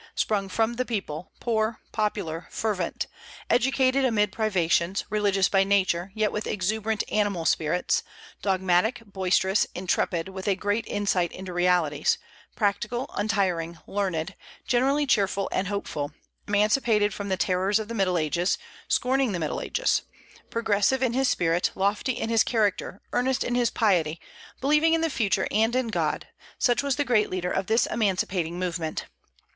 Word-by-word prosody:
Sprung 200 Hz, -3 st, 0 dB
from 225 Hz, +4 st, 0 dB
the 255 Hz, -, +1 dB
people, 190 Hz, -9 st, -4 dB
poor, 220 Hz, -1 st, 0 dB
popular, 195 Hz, -6 st, -2 dB
fervent; 200 Hz, -6 st, -2 dB, 0.5 s
educated 260 Hz, +2 st, +3 dB
amid 210 Hz, -6 st, +2 dB
privations, 190 Hz, -3 st, +1 dB
religious 200 Hz, -3 st, +2 dB
by 195 Hz, -1 st, +3 dB
nature, 190 Hz, -2 st, +1 dB
yet 215 Hz, -1 st, +1 dB
with 210 Hz, -, -3 dB
exuberant 215 Hz, +2 st, -1 dB
animal 205 Hz, -6 st, 0 dB
spirits; 160 Hz, +3 st, +1 dB, 0.4 s
dogmatic, 190 Hz, +4 st, +1 dB
boisterous, 190 Hz, 0 st, +1 dB
intrepid, 175 Hz, -1 st, 0 dB
with 190 Hz, 0 st, -7 dB
a 200 Hz, -, +3 dB
great 205 Hz, +4 st, -1 dB
insight 190 Hz, -4 st, 0 dB
into 185 Hz, -1 st, -7 dB
realities; 175 Hz, -4 st, +2 dB, 0.4 s
practical, 215 Hz, +4 st, -1 dB
untiring, 185 Hz, -6 st, 0 dB
learned, 190 Hz, -3 st, -2 dB, 0.3 s
generally 270 Hz, +4 st, +2 dB
cheerful 200 Hz, -6 st, +1 dB
and 185 Hz, -, 0 dB
hopeful; 155 Hz, -8 st, -3 dB, 0.4 s
emancipated 210 Hz, 0 st, +2 dB
from 200 Hz, +1 st, -5 dB
the 190 Hz, -, 0 dB
terrors 190 Hz, +2 st, +2 dB
of 220 Hz, -1 st, -4 dB
the 230 Hz, -, -5 dB
Middle 190 Hz, -5 st, +1 dB
Ages, 170 Hz, +3 st, +1 dB, 0.3 s
scorning 260 Hz, -3 st, +1 dB
the 175 Hz, -, -2 dB
Middle 155 Hz, -2 st, -2 dB
Ages; -, -, +1 dB, 0.5 s
progressive 230 Hz, +3 st, +1 dB
in 245 Hz, -2 st, +1 dB
his 265 Hz, +1 st, +2 dB
spirit, 170 Hz, 0 st, +1 dB
lofty 205 Hz, +7 st, 0 dB
in 225 Hz, -, -3 dB
his 225 Hz, -1 st, +5 dB
character, 205 Hz, -4 st, 0 dB
earnest 255 Hz, +1 st, +1 dB
in 245 Hz, -, -2 dB
his 245 Hz, -1 st, +2 dB
piety, 170 Hz, -7 st, +1 dB, 0.4 s
believing 300 Hz, +4 st, +3 dB
in 325 Hz, -, 0 dB
the 325 Hz, -1 st, 0 dB
future 200 Hz, -7 st, +1 dB
and 225 Hz, +3 st, +2 dB
in 255 Hz, -2 st, 0 dB
God, 220 Hz, -, -1 dB, 0.3 s
such 245 Hz, -2 st, +2 dB
was 280 Hz, -2 st, 0 dB
the 290 Hz, -, 0 dB
great 225 Hz, -4 st, +2 dB
leader 180 Hz, -1 st, -2 dB
of 190 Hz, -, -1 dB
this 225 Hz, +2 st, +3 dB
emancipating 185 Hz, -5 st, -1 dB
movement. 170 Hz, -3 st, -3 dB
205 Hz, 150 wpm, -26 LUFS, 185-225 Hz, 0.5 s, his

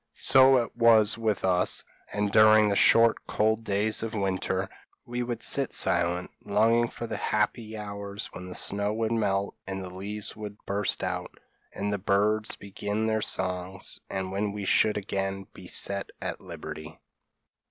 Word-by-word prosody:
So 135 Hz, 0 st, +6 dB
it 120 Hz, -2 st, -2 dB
was 115 Hz, -3 st, +5 dB
with 110 Hz, -4 st, -1 dB
us; 90 Hz, -1 st, +1 dB, 0.3 s
and 105 Hz, -1 st, -1 dB
during 110 Hz, 0 st, +6 dB
the 100 Hz, -, +1 dB
short 115 Hz, +3 st, +5 dB
cold 110 Hz, +1 st, +1 dB
days 105 Hz, +1 st, 0 dB
of 115 Hz, 0 st, -4 dB
winter, 95 Hz, -2 st, -1 dB, 0.4 s
we 120 Hz, +1 st, -3 dB
would 120 Hz, -1 st, -4 dB
sit 140 Hz, -2 st, 0 dB
silent, 90 Hz, +1 st, 0 dB
longing 115 Hz, +3 st, +3 dB
for 120 Hz, -, -6 dB
the -, -, -4 dB
happy 110 Hz, +1 st, -1 dB
hours 100 Hz, -1 st, -5 dB
when 90 Hz, 0 st, -8 dB
the 90 Hz, -, -6 dB
snow 100 Hz, +1 st, 0 dB
would 110 Hz, 0 st, -1 dB
melt 100 Hz, -3 st, 0 dB
and 95 Hz, 0 st, -4 dB
the 90 Hz, -, -8 dB
leaves 105 Hz, +3 st, -4 dB
would 105 Hz, -1 st, -8 dB
burst 100 Hz, 0 st, 0 dB
out, -, -, -4 dB, 0.3 s
and 100 Hz, +1 st, -2 dB
the 100 Hz, -, -2 dB
birds 105 Hz, +3 st, +1 dB
begin 105 Hz, +2 st, -3 dB
their 110 Hz, 0 st, +1 dB
songs, 90 Hz, -1 st, -2 dB
and 95 Hz, -1 st, -3 dB
when 100 Hz, +1 st, -1 dB
we 100 Hz, -1 st, -5 dB
should 105 Hz, +2 st, +3 dB
again 95 Hz, -1 st, -3 dB
be 90 Hz, -, -12 dB
set 100 Hz, +2 st, -1 dB
at -, -, -4 dB
liberty. 80 Hz, +1 st, -8 dB
105 Hz, 165 wpm, -27 LUFS, 95-110 Hz, 0.4 s, So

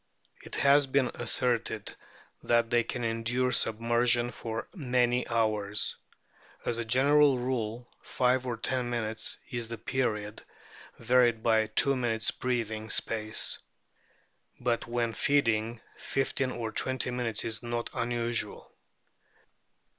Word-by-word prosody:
It -, -, -9 dB
has 140 Hz, 0 st, +4 dB
been 130 Hz, -1 st, +1 dB
asserted 120 Hz, -3 st, -1 dB, 0.5 s
that 115 Hz, 0 st, +2 dB
they 120 Hz, -1 st, +3 dB
can 120 Hz, +1 st, -4 dB
endure 115 Hz, +3 st, 0 dB
submersion 120 Hz, +1 st, +2 dB
for 115 Hz, -1 st, -5 dB
"many 125 Hz, -5 st, +1 dB
hours 105 Hz, -3 st, +1 dB, 0.4 s
"; -, -, -27 dB
as 120 Hz, -, -1 dB
a 115 Hz, -, -2 dB
general 140 Hz, +3 st, +4 dB
rule 120 Hz, -2 st, -3 dB
five 125 Hz, 0 st, +1 dB
or 120 Hz, -2 st, -2 dB
ten 125 Hz, +1 st, -2 dB
minutes 110 Hz, -2 st, -3 dB
is 120 Hz, -2 st, -3 dB
the 115 Hz, 0 st, -6 dB
period, 105 Hz, -3 st, -2 dB, 0.6 s
varied 120 Hz, -1 st, +3 dB
by 110 Hz, -1 st, +3 dB
two 135 Hz, +5 st, +3 dB
minutes' 115 Hz, -3 st, 0 dB
breathing 110 Hz, -3 st, -3 dB
space. 110 Hz, -1 st, +2 dB, 1.0 s
But 120 Hz, -1 st, -1 dB
when 120 Hz, -1 st, -1 dB
feeding, 115 Hz, -3 st, +1 dB, 0.2 s
fifteen 135 Hz, -1 st, -1 dB
or 115 Hz, -3 st, -4 dB
twenty 130 Hz, +1 st, 0 dB
minutes 120 Hz, -3 st, -1 dB
is 110 Hz, -2 st, -3 dB
not 120 Hz, 0 st, -3 dB
unusual. 120 Hz, -1 st, -2 dB
120 Hz, 120 wpm, -29 LUFS, 115-125 Hz, 1.0 s, has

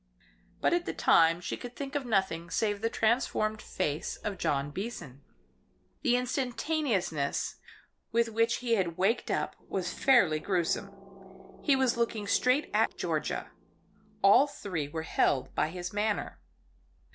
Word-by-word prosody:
But -, -, +3 dB
at 345 Hz, 0 st, +1 dB
the -, -, -3 dB
time 165 Hz, +1 st, +4 dB
she -, -, -3 dB
could 245 Hz, -1 st, -9 dB
think 280 Hz, -1 st, -6 dB
of 285 Hz, -4 st, -2 dB
nothing 190 Hz, -6 st, 0 dB
save 205 Hz, +3 st, 0 dB
the 230 Hz, -, +1 dB
transformed 220 Hz, -2 st, +1 dB
face 155 Hz, -3 st, -2 dB
of 200 Hz, -3 st, -4 dB
John 140 Hz, 0 st, 0 dB
Beason. 170 Hz, -, -6 dB, 0.8 s
The 250 Hz, -4 st, +3 dB
instantaneousness 250 Hz, -, -1 dB, 0.5 s
with 235 Hz, 0 st, +2 dB
which 230 Hz, +1 st, +2 dB
he 235 Hz, -, +2 dB
had 180 Hz, -6 st, 0 dB
waked 200 Hz, +6 st, +1 dB
up -, -, -1 dB
was -, -, -2 dB
fairly 195 Hz, -, +4 dB
gruesome. 185 Hz, +2 st, -1 dB, 0.7 s
He 285 Hz, -, +3 dB
was 260 Hz, -3 st, +2 dB
looking 230 Hz, -3 st, -1 dB
straight 250 Hz, +7 st, +2 dB
at -, -, +2 dB
Georgia; -, -, -2 dB, 0.7 s
all 205 Hz, +8 st, +7 dB
three 180 Hz, -, -4 dB
were 160 Hz, +2 st, -5 dB
held 135 Hz, -4 st, +1 dB
by -, -, +1 dB
his 180 Hz, +2 st, -6 dB
manner. 210 Hz, 0 st, -1 dB
210 Hz, 140 wpm, -30 LUFS, 170-245 Hz, 0.8 s, all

